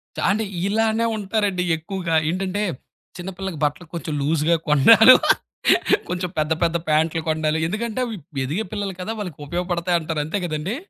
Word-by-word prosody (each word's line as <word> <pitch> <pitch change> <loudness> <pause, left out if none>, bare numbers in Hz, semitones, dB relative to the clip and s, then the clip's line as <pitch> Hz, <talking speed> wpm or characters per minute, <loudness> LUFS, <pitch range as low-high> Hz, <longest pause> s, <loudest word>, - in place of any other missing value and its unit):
చ - - -6
అంటే 215 +2 +1 0.2
ఇలానే 225 +2 +1
ఉంటారండి 200 -3 -1
ఎక్కువగా. 170 0 -3
ఏంటంటే, 190 +3 -2 0.6
చిన్న 180 +1 -6
పిల్లలకి 190 -5 -5
బట్టలకి 150 +3 -2
కొంచెం 160 -2 -4
లూజ్‌గా 155 +3 +2
కొనడాలు, 220 - +8 0.9
కొంచెం 180 0 -2
పెద్ద 155 +1 +1
పెద్ద 170 0 +2
ప్యాంటులు 160 +1 +2
కొనడాలు. 155 0 0
ఎందుకంటే, 220 +5 -3
అవి 230 -2 -5 0.3
ఎదిగే 160 +11 -2
పిల్లలు 200 -3 -4
కదా! 180 - -4
వాళ్ళకి 180 -8 -6
ఉపయోగపడతాయంటారు. 170 -2 -1
అంతే 170 +7 -2
గదండీ! 160 +6 -3
175 Hz, 145 wpm, -22 LUFS, 160-205 Hz, 0.9 s, కొనడాలు